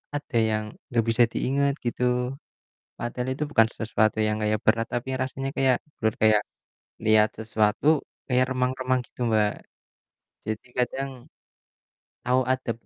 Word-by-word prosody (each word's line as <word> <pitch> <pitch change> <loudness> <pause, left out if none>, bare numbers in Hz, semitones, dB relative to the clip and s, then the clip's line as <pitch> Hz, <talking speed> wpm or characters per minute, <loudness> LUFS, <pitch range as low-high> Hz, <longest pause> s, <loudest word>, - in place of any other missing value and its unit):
ada 145 -4 -3
yang 110 0 0 0.3
nggak 115 -2 +2
bisa 120 +1 +4
diinget," 140 +3 +1
gitu. 125 +1 0 0.6
Padahal 125 +1 -3
itu - - -1
bukan 115 -4 +5
sesuatu 110 -1 0
yang 105 0 0
kayak 105 0 +1
berat, 115 +1 +3
tapi 120 +2 -3
rasanya 135 +1 -3
kayak 130 -2 +4 0.2
blur 110 -1 +2
kayak 110 -1 +5 0.6
lihat 110 -1 +4
sesuatu, 110 +4 +1 0.4
kayak 125 -1 +3
remang-remang 130 0 0
gitu, - - -31
Mbak. 105 -1 +3 0.9
Jadi, 110 +3 -4
kadang 135 +2 -1 1.1
tahu 125 +1 +3
ada 130 -2 0
120 Hz, 130 wpm, -26 LUFS, 110-130 Hz, 1.1 s, bukan